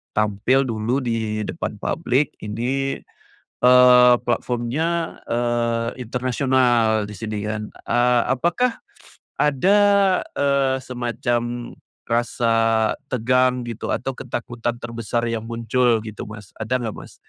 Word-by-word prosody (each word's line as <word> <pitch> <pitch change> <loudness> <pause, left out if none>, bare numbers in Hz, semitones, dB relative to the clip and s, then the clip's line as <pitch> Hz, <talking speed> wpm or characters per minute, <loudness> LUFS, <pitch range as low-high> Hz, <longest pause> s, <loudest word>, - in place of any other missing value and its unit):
tampil 105 +6 +2
dulu, 120 +3 -1
di 110 -2 -2
depan - - -4
publik 130 +3 0
ini, 125 +6 -2 0.7
eee, 125 0 +7
platformnya, 125 +8 -1
eee 115 -1 0
internasional, 125 -3 +1
di 105 - -9
sini 105 +1 -4
kan. 105 -1 -4 0.2
Eee, 120 0 +3
apakah 175 - 0 0.6
ada, 150 +8 +3 0.6
eee, 140 -2 +2
semacam 120 -1 -3 0.3
rasa 115 0 +1 0.6
tegang, 125 +1 +1
gitu, 115 - -5
atau 130 +1 -2
ketakutan 120 0 -4
terbesar 115 0 -3
yang 115 -1 -2
muncul, 115 +1 +1
gitu, 110 -2 -7
Mas? 105 -2 -11
Ada 115 +4 -1
nggak, 110 -3 -4
Mas? - - -11
120 Hz, 110 wpm, -22 LUFS, 115-130 Hz, 0.7 s, eee